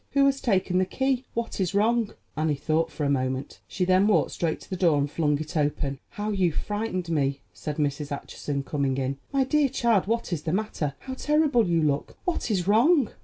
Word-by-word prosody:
"Who 275 Hz, 0 st, +5 dB
has 275 Hz, -1 st, +2 dB
taken 185 Hz, -5 st, +1 dB
the 185 Hz, -, +3 dB
key? 265 Hz, +4 st, 0 dB
What 230 Hz, -2 st, -3 dB
is 185 Hz, -1 st, 0 dB
wrong?" 225 Hz, +1 st, +2 dB, 0.2 s
Annie 155 Hz, -1 st, +1 dB
thought 155 Hz, +3 st, 0 dB
for 150 Hz, -, -4 dB
a 140 Hz, -, +1 dB
moment; 130 Hz, 0 st, -2 dB
she 185 Hz, -, -1 dB
then 185 Hz, +2 st, +4 dB
walked 215 Hz, -, +3 dB
straight 165 Hz, -2 st, -1 dB
to -, -, -14 dB
the -, -, -1 dB
door 170 Hz, -5 st, +3 dB
and 140 Hz, 0 st, +1 dB
flung 150 Hz, -3 st, +1 dB
it 155 Hz, +4 st, -7 dB
open. 145 Hz, -2 st, 0 dB
"How 210 Hz, +1 st, -3 dB
you 185 Hz, -4 st, +2 dB
frightened 205 Hz, +1 st, -3 dB
me," 140 Hz, -3 st, 0 dB
said 150 Hz, -1 st, -5 dB
Mrs. 145 Hz, -1 st, -1 dB
Acheson, 140 Hz, 0 st, -4 dB
coming 140 Hz, -2 st, -1 dB
in. 135 Hz, +1 st, -2 dB
"My 275 Hz, -1 st, +3 dB
dear 290 Hz, +1 st, +2 dB
child, 235 Hz, -7 st, +2 dB
what 230 Hz, -4 st, -1 dB
is 160 Hz, -, -2 dB
the 160 Hz, +1 st, -2 dB
matter? 185 Hz, -9 st, -2 dB
How 260 Hz, -, -6 dB
terrible 295 Hz, -5 st, +2 dB
you 165 Hz, -2 st, +2 dB
look! 145 Hz, -1 st, -1 dB
What 355 Hz, -8 st, -1 dB
is 190 Hz, -4 st, 0 dB
wrong?" 250 Hz, -, +4 dB
180 Hz, 215 wpm, -26 LUFS, 150-230 Hz, 0.2 s, Who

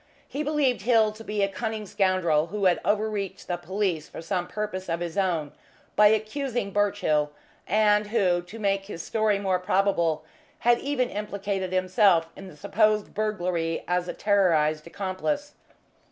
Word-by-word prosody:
He 285 Hz, -, -4 dB
believed 290 Hz, -5 st, +1 dB
Hill 220 Hz, -1 st, +4 dB
to 215 Hz, +1 st, -11 dB
be 210 Hz, -2 st, -1 dB
a -, -, +3 dB
cunning 220 Hz, +1 st, -4 dB
scoundrel 185 Hz, -6 st, +1 dB
who 200 Hz, +3 st, -2 dB
had 180 Hz, -2 st, +4 dB
overreached 210 Hz, -2 st, -1 dB
the 175 Hz, -, -1 dB
police 185 Hz, -4 st, -2 dB
for -, -, -9 dB
some 175 Hz, +2 st, -2 dB
purpose 200 Hz, -3 st, -4 dB
of 165 Hz, 0 st, -1 dB
his 170 Hz, -2 st, -4 dB
own 170 Hz, -7 st, 0 dB, 0.4 s
by 210 Hz, -, +7 dB
accusing 220 Hz, +1 st, -1 dB
Birchill, 190 Hz, -8 st, +1 dB, 0.4 s
and 210 Hz, 0 st, +3 dB
who, 190 Hz, -5 st, +2 dB
to 175 Hz, +6 st, -11 dB
make 195 Hz, -2 st, 0 dB
his 170 Hz, -5 st, -7 dB
story 215 Hz, -2 st, +1 dB
more 190 Hz, -2 st, 0 dB
probable, 180 Hz, -4 st, +1 dB, 0.4 s
had 240 Hz, 0 st, +4 dB
even 270 Hz, -3 st, -1 dB
implicated 200 Hz, -2 st, -3 dB
himself 185 Hz, -2 st, +3 dB
in 195 Hz, -, -10 dB
the 180 Hz, -, -13 dB
supposed 215 Hz, +5 st, +1 dB
burglary 180 Hz, -6 st, -1 dB
as 180 Hz, 0 st, 0 dB
a -, -, -3 dB
terrorised 165 Hz, -7 st, +2 dB
accomplice. 200 Hz, -, -3 dB
195 Hz, 155 wpm, -26 LUFS, 175-215 Hz, 0.4 s, by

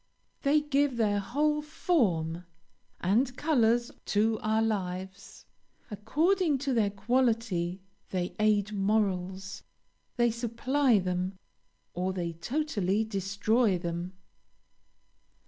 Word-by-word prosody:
They 295 Hz, +1 st, +3 dB
give 285 Hz, -3 st, +1 dB
their 205 Hz, -3 st, +2 dB
whole 300 Hz, +9 st, 0 dB
form 180 Hz, -, 0 dB, 0.6 s
and 245 Hz, +8 st, +1 dB
colors 240 Hz, -6 st, +2 dB
to 215 Hz, +1 st, +1 dB
our 220 Hz, +1 st, +1 dB
lives. 190 Hz, -2 st, -4 dB, 0.5 s
According 310 Hz, -, +1 dB
to 270 Hz, -, +1 dB
their 220 Hz, -4 st, +2 dB
quality 210 Hz, -4 st, 0 dB, 0.3 s
they 180 Hz, -1 st, -2 dB
aid 215 Hz, -1 st, +2 dB
morals, 195 Hz, -2 st, -1 dB, 0.5 s
they 240 Hz, -1 st, +3 dB
supply 240 Hz, +2 st, +1 dB
them, 185 Hz, 0 st, -2 dB, 0.6 s
or 185 Hz, +1 st, -1 dB
they 170 Hz, -2 st, -3 dB
totally 215 Hz, -, -1 dB
destroy 200 Hz, +1 st, +1 dB
them." 175 Hz, +1 st, -4 dB
215 Hz, 95 wpm, -29 LUFS, 190-250 Hz, 0.6 s, They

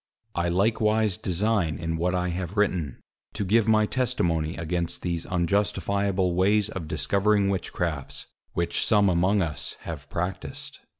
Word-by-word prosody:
I 85 Hz, 0 st, 0 dB
likewise 105 Hz, +2 st, +2 dB
design 100 Hz, -5 st, 0 dB
in 80 Hz, +1 st, -2 dB
what 90 Hz, +3 st, 0 dB
I 90 Hz, 0 st, 0 dB
have 90 Hz, +3 st, -4 dB
written, 90 Hz, -10 st, +1 dB, 0.4 s
to 105 Hz, -, -2 dB
give 110 Hz, +3 st, +3 dB
my 110 Hz, -1 st, +4 dB
testimony 85 Hz, -11 st, 0 dB
against 85 Hz, 0 st, -2 dB
these 85 Hz, -2 st, -2 dB
unjustifiable 100 Hz, +1 st, +1 dB
ways 100 Hz, +3 st, +3 dB
of 95 Hz, -7 st, -5 dB
discovering 100 Hz, +7 st, +2 dB
Witchcrafts, 85 Hz, -6 st, -3 dB, 0.3 s
which 85 Hz, 0 st, 0 dB
some 105 Hz, -3 st, +4 dB
among 95 Hz, +3 st, +3 dB
us 75 Hz, -3 st, -5 dB
have 75 Hz, -4 st, -7 dB
practised. 90 Hz, +1 st, -5 dB
90 Hz, 135 wpm, -26 LUFS, 85-105 Hz, 0.4 s, my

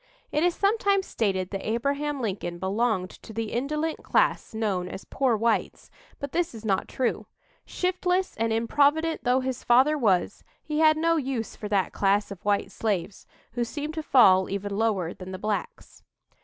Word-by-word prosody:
It 300 Hz, -, +1 dB
is 350 Hz, 0 st, +2 dB
sometimes 400 Hz, -2 st, +2 dB
stated 190 Hz, -4 st, -1 dB
that 195 Hz, -1 st, -4 dB
Abraham 280 Hz, +5 st, -1 dB
Lincoln 185 Hz, -5 st, -3 dB
belonged 190 Hz, 0 st, 0 dB
to -, -, -13 dB
the 225 Hz, 0 st, -3 dB
indolent 300 Hz, +6 st, -2 dB
class -, -, +1 dB
known 195 Hz, -5 st, -1 dB
as 190 Hz, -, -8 dB
"poor 260 Hz, -5 st, +1 dB
whites," 230 Hz, +1 st, -1 dB, 0.3 s
but 280 Hz, -1 st, -6 dB
this 340 Hz, -7 st, -1 dB
is 220 Hz, 0 st, -9 dB
not 195 Hz, -3 st, 0 dB
true. 255 Hz, -2 st, -2 dB, 0.4 s
Shiftless 365 Hz, 0 st, -1 dB
and 225 Hz, 0 st, 0 dB
improvident 290 Hz, +8 st, +2 dB
though 250 Hz, +2 st, +3 dB
his 255 Hz, -1 st, -4 dB
father 265 Hz, +5 st, +4 dB
was, 195 Hz, -8 st, +1 dB, 0.2 s
he 305 Hz, -1 st, -2 dB
had 310 Hz, -1 st, +5 dB
no 330 Hz, +1 st, +2 dB
use 260 Hz, -6 st, -3 dB
for 210 Hz, -, -6 dB
that 200 Hz, -3 st, +1 dB
class 200 Hz, +1 st, +1 dB
of 195 Hz, -, -9 dB
white 200 Hz, -1 st, 0 dB
slaves, 200 Hz, -3 st, -3 dB, 0.2 s
who 240 Hz, -, -1 dB
seemed 295 Hz, +6 st, -5 dB
to 315 Hz, -, -3 dB
fall 190 Hz, -11 st, +5 dB
even 200 Hz, +1 st, -3 dB
lower 200 Hz, -6 st, 0 dB
than 185 Hz, 0 st, -9 dB
the 185 Hz, -, -5 dB
blacks. 210 Hz, +2 st, -4 dB
230 Hz, 170 wpm, -26 LUFS, 200-300 Hz, 0.4 s, had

